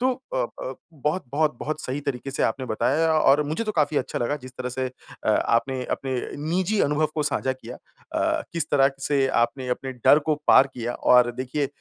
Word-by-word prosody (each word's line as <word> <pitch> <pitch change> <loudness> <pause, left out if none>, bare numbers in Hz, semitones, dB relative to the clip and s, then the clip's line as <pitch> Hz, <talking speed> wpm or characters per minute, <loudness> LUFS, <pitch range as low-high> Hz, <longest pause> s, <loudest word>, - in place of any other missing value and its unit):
तो 255 +1 +3 0.2
up - - 0
up - - -5 0.2
बहुत 150 +3 -2
बहुत 150 -4 +1
बहुत 155 +1 -3
सही 135 +1 -4
तरीके 135 -1 -4
से 135 - -2
आपने 130 +3 0
बताया 150 +9 +1
और 145 0 +5
मुझे 160 +10 -2
तो 215 - -2
काफ़ी 150 -1 +1
अच्छा - - -1
लगा 135 +5 -1
जिस 130 - -10
तरह 125 0 -3
से 130 +1 -2 0.4
अ, - - -1
आपने 125 +2 +1
अपने 135 -1 -2 0.4
निजी 190 +4 +1
अनुभव 150 +2 +2
को 155 - 0
साझा 130 -2 0
किया 130 - -10
अ, - - -3
किस 170 -1 -1
तरह 135 -1 +4
से 135 -1 +2 0.2
आपने 125 +2 -2
अपने 130 +1 -3
डर 125 +4 +5
को 155 - +4
पार 135 - +7
किया 120 0 -3
और 125 -1 +4
देखिए 130 +3 -2
140 Hz, 205 wpm, -24 LUFS, 130-155 Hz, 0.4 s, पार